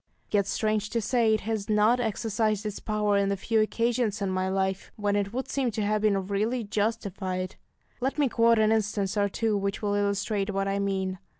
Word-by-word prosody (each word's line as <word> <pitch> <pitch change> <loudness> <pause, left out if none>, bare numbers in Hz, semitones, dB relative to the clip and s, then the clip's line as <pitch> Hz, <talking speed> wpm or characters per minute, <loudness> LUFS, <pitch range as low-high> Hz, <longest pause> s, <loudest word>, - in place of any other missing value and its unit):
Yet, 200 -2 +2
strange 215 0 0
to 235 - 0
say, 230 0 +2
it 215 - -3
has 220 -1 -3
not 215 +3 +4
exercised 220 -1 -1
its 210 -2 -4
power 210 -1 +1
in 200 0 +2
the 200 - 0
few 220 +3 +1
occasions 230 -1 0
in 195 -2 -1
my 185 0 0
life 190 0 -1
when 205 -1 0
it 200 -1 0
would 260 +3 -3
seem 270 -3 0
to 215 - -1
have 210 +1 +1
been 200 -3 +2
really 215 +5 -1
justified. 200 -3 -2 0.4
Let 265 +3 -1
me 290 -2 +3
quote 230 -1 +4
an 215 0 +4
instance 210 -2 0
or 200 -1 +2
two 220 +2 0
which 200 +1 -2
will 205 -1 +1
illustrate 200 0 0
what 195 0 -1
I 195 0 0
mean. 190 -2 -1
210 Hz, 205 wpm, -27 LUFS, 200-220 Hz, 0.4 s, not